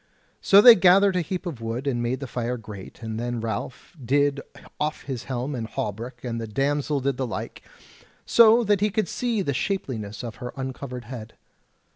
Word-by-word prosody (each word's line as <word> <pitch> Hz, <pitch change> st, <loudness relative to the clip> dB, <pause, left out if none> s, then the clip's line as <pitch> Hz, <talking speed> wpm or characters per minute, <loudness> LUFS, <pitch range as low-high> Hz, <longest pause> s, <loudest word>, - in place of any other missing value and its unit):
So 200 Hz, +1 st, +7 dB
they 240 Hz, +2 st, +11 dB
gathered 190 Hz, 0 st, +5 dB
a 180 Hz, -, +2 dB
heap 180 Hz, +3 st, -4 dB
of 150 Hz, -10 st, -5 dB
wood 115 Hz, +4 st, -4 dB
and 125 Hz, -4 st, 0 dB
made 125 Hz, +3 st, -2 dB
the -, -, -3 dB
fire 125 Hz, 0 st, -3 dB
great; 105 Hz, -1 st, -10 dB
and 110 Hz, 0 st, -4 dB
then 120 Hz, 0 st, -3 dB
Ralph 115 Hz, -, -5 dB
did 140 Hz, +3 st, +2 dB, 0.4 s
off 150 Hz, +1 st, -2 dB
his 130 Hz, -4 st, -5 dB
helm 130 Hz, +2 st, -3 dB
and 115 Hz, -4 st, -4 dB
hauberk 115 Hz, +4 st, -5 dB
and 115 Hz, -2 st, -3 dB
the 115 Hz, -, -5 dB
damsel 140 Hz, +4 st, 0 dB
did 135 Hz, -1 st, -1 dB
the 130 Hz, -1 st, -2 dB
like, -, -, -6 dB, 0.6 s
so 230 Hz, +1 st, +6 dB
that 205 Hz, -2 st, +2 dB
he 210 Hz, -, +3 dB
could 210 Hz, -1 st, -1 dB
see 230 Hz, +1 st, -1 dB
the 140 Hz, -, -1 dB
shapeliness 120 Hz, -, -3 dB
of 115 Hz, -2 st, -7 dB
her 125 Hz, -1 st, -7 dB
uncovered 130 Hz, -1 st, -6 dB
head. 120 Hz, -3 st, -9 dB
130 Hz, 190 wpm, -25 LUFS, 120-170 Hz, 0.6 s, they